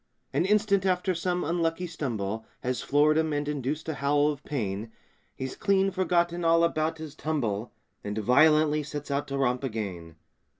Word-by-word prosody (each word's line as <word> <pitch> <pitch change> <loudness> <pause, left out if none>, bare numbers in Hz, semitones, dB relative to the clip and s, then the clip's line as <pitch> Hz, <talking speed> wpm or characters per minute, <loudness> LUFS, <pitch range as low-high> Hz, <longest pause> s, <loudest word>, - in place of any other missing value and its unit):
An - - +2
instant 200 -1 +3
after 185 0 +1
some 180 +1 -1
unlucky 165 +2 0
stumble 115 - -3 0.2
Has 125 0 -2
floored 150 +2 +3
him 160 -1 0
and 145 0 -1
induced 150 +1 -3
a 160 - -1
howl 145 +1 +2
of 145 -2 -8
pain, 110 -5 -3 0.4
He's 130 0 -5
clean 195 -1 +2
forgotten 175 -2 +1
all 165 0 +4
about 160 -1 0
his 155 -2 -8
tumble 120 -9 -2 0.3
And 105 +1 -4
violently 150 +6 +4
sets 145 -1 -6
out 140 +1 -1
to 140 - -3
romp 125 -1 +1
again. 95 -9 -5
150 Hz, 165 wpm, -27 LUFS, 130-165 Hz, 0.4 s, all